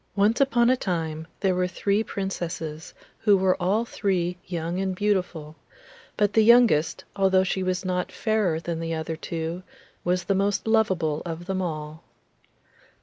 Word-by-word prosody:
Once 210 Hz, +5 st, +3 dB
upon 245 Hz, -3 st, +3 dB
a -, -, +4 dB
time 160 Hz, -7 st, -3 dB
there 190 Hz, -2 st, +2 dB
were 180 Hz, 0 st, +1 dB
three 200 Hz, +3 st, 0 dB
Princesses 170 Hz, -6 st, -5 dB, 0.2 s
who 205 Hz, -3 st, +4 dB
were 185 Hz, -1 st, +3 dB
all 205 Hz, +6 st, +1 dB
three 180 Hz, -6 st, -1 dB
young 170 Hz, 0 st, -3 dB
and 190 Hz, -1 st, -1 dB
beautiful; 180 Hz, -6 st, -1 dB, 0.6 s
but 205 Hz, -1 st, +2 dB
the 220 Hz, -, +5 dB
youngest, 225 Hz, -9 st, +4 dB
although 190 Hz, -1 st, +3 dB
she 190 Hz, 0 st, -1 dB
was 185 Hz, 0 st, -1 dB
not 180 Hz, -1 st, -1 dB
fairer 210 Hz, -7 st, 0 dB
than 165 Hz, 0 st, -4 dB
the 165 Hz, 0 st, -2 dB
other 160 Hz, +1 st, -3 dB
two, 165 Hz, +2 st, -4 dB, 0.4 s
was 180 Hz, 0 st, 0 dB
the 195 Hz, -, 0 dB
most 200 Hz, +1 st, 0 dB
loveable 185 Hz, -9 st, +2 dB
of 170 Hz, 0 st, -6 dB
them 190 Hz, 0 st, -2 dB
all. 155 Hz, -2 st, -5 dB
185 Hz, 155 wpm, -25 LUFS, 165-200 Hz, 0.6 s, the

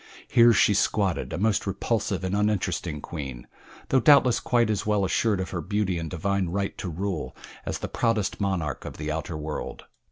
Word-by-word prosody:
Here 120 Hz, 0 st, +6 dB
she 105 Hz, -, +4 dB
squatted, 100 Hz, -1 st, 0 dB
a -, -, -3 dB
most 105 Hz, +1 st, +1 dB
repulsive 100 Hz, -1 st, -1 dB
and 95 Hz, +1 st, -1 dB
uninteresting 100 Hz, -7 st, -1 dB
queen; 70 Hz, -8 st, -6 dB, 0.4 s
though 130 Hz, -, +4 dB
doubtless 135 Hz, -2 st, +5 dB
quite 120 Hz, -3 st, +2 dB
as 105 Hz, -, -1 dB
well 105 Hz, -2 st, +1 dB
assured 105 Hz, +1 st, +1 dB
of 95 Hz, -, -4 dB
her 85 Hz, -, -3 dB
beauty 100 Hz, -3 st, -1 dB
and 80 Hz, -1 st, -4 dB
divine 95 Hz, +1 st, -1 dB
right 100 Hz, +2 st, -2 dB
to 95 Hz, -, -4 dB
rule 90 Hz, -1 st, -4 dB, 0.3 s
as -, -, -1 dB
the -, -, -5 dB
proudest 110 Hz, -4 st, 0 dB
monarch 90 Hz, -7 st, -1 dB
of -, -, -8 dB
the 75 Hz, 0 st, -3 dB
outer 80 Hz, +1 st, -4 dB
world. 75 Hz, 0 st, -5 dB
95 Hz, 185 wpm, -26 LUFS, 85-105 Hz, 0.4 s, Here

